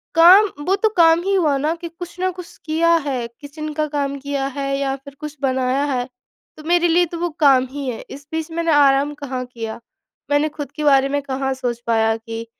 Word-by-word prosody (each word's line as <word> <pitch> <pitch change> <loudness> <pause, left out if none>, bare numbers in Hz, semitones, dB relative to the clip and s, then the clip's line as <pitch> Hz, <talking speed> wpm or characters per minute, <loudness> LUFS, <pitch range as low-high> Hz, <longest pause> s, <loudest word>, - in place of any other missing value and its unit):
काम 375 +5 +8 0.2
वो 380 - +3
तो 435 +2 +1
काम 330 0 +6
ही 395 +1 0
हुआ 305 -7 +2
ना, 300 +4 0
कि 340 0 -7
कुछ 345 +1 -10
ना 370 0 +1
कुछ 360 -1 -11
किया 335 +2 +3
है, 250 -4 -2
किचन 305 +1 -7
का 305 0 -1
काम 280 -1 -2
किया 280 0 -3
है 275 0 -1
या 270 -1 -1
फिर 275 +1 -14
कुछ 300 0 -7
बनाया 260 0 +1
है, 245 -1 -1 0.5
तो 310 - -11
मेरे 345 0 +3
लिए 350 +1 +3
तो 340 +1 -7
वो 350 0 -1
काम 270 -4 +5
ही 285 0 -5
है। 235 - -5
इस 280 +1 -10
बीच 320 0 -3
मैंने 335 0 0
आराम 285 0 +4
कहाँ 260 -3 -4
किया, 230 -3 -7 0.5
मैंने 295 +2 +2
खुद 290 -1 -7
के 305 - -6
बारे 275 -2 +4
में 285 0 0
कहाँ 270 -1 -2
सोच 245 -2 -3
पाया 225 -1 +2
कि 225 0 -7
285 Hz, 220 wpm, -20 LUFS, 270-330 Hz, 0.5 s, काम